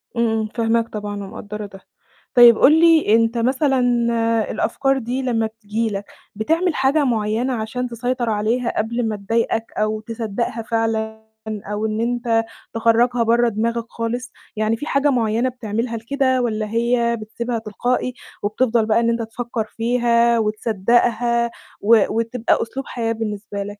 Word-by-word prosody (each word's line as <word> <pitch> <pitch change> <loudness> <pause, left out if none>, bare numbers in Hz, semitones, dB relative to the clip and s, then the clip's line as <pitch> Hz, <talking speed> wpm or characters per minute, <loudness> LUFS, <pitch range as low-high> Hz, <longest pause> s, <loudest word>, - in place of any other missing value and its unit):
امم، 235 0 +2
امم، 215 - -2
فاهماك 230 0 +1
طبعًا، 210 -1 -5
ومقدرة 210 +2 -7
ده، 195 -1 -12 0.6
طيب 240 -2 +8
قل 305 +4 +6
لي 325 -9 +5
أنت 230 +1 +2
مثلًا 260 +3 +2 0.7
الأفكار 270 +4 0
دي 255 +1 -3
لما 230 -3 0
بتيجي 220 0 -3
لك، 200 0 -4 0.3
بتعمل 325 - 0
حاجة 275 +3 +2
معيّنة 230 0 0
عشان 240 +2 -3
تسيطر 245 0 -2
عليها، 225 +3 0
قبل 235 +2 -1
ما 215 - -2
تضايقك، 225 +2 -1
أو 215 0 0
تصدقها 230 0 -3
فعلًا 220 -1 -2 0.2
أو 210 0 -4
إن 215 0 -1
أنت 235 -1 +1 0.3
تخرجها 230 +2 +2
برّا 235 +1 +3
دماغك 230 +2 -1
خالص؟ 240 +2 -4 0.2
يعني 215 +1 0
في 295 - -6
حاجة 280 -1 +2
معيّنة 235 -1 +1
بتعملها 230 -1 -3
لكده، 260 +2 0
والّا 220 -3 -1
هي 235 +1 +1
بتسيبها 235 +2 -4
تلقائي، 245 +4 -2 0.3
وبتفضل 225 +2 +1
بقى 215 +1 +3
إن 235 0 +2
أنت 235 0 0
تفكر 230 0 -4
فيها، 235 +1 +2
وتصدقها، 235 +2 +1 0.3
و 220 0 +5
وتبقى 230 +1 0
أسلوب 265 +3 -4
حياة 230 -2 -2
بالنسبة 210 -2 -4
لك؟ - - -8
230 Hz, 145 wpm, -20 LUFS, 220-245 Hz, 0.7 s, طيب